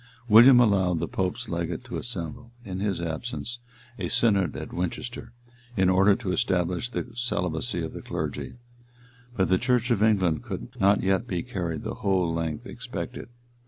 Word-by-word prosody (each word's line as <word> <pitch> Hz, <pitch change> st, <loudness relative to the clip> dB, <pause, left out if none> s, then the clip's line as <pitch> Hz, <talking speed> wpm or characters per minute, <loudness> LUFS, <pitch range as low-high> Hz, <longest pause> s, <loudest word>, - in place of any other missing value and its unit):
William 120 Hz, +4 st, +9 dB
allowed 95 Hz, -6 st, +3 dB
the -, -, -2 dB
pope's 105 Hz, +6 st, -2 dB
legate 85 Hz, -4 st, -3 dB
to -, -, -7 dB
assemble, 115 Hz, +1 st, -6 dB
in 95 Hz, -2 st, -5 dB
his 100 Hz, -2 st, -1 dB
absence 120 Hz, +9 st, -4 dB, 0.4 s
a -, -, -1 dB
synod 100 Hz, -6 st, +2 dB
at -, -, -7 dB
Winchester, 120 Hz, +8 st, -4 dB, 0.5 s
in 95 Hz, -1 st, +4 dB
order 95 Hz, +2 st, +5 dB
to 115 Hz, -6 st, -3 dB
establish 90 Hz, +4 st, 0 dB
the 120 Hz, -, -4 dB
celibacy 100 Hz, -5 st, -2 dB
of 80 Hz, -, -5 dB
the -, -, -7 dB
clergy; -, -, -4 dB, 0.8 s
but 95 Hz, -, +3 dB
the 95 Hz, 0 st, +3 dB
church 125 Hz, -1 st, +1 dB
of 110 Hz, -4 st, +2 dB
England 100 Hz, -5 st, +3 dB
could 110 Hz, -3 st, -6 dB
not 100 Hz, +1 st, +4 dB
yet 95 Hz, +5 st, +1 dB
be 90 Hz, -7 st, -2 dB
carried 85 Hz, -10 st, -4 dB
the -, -, -3 dB
whole 90 Hz, -4 st, +1 dB
length 80 Hz, -2 st, -3 dB
expected. -, -, -6 dB
95 Hz, 160 wpm, -26 LUFS, 90-120 Hz, 0.8 s, William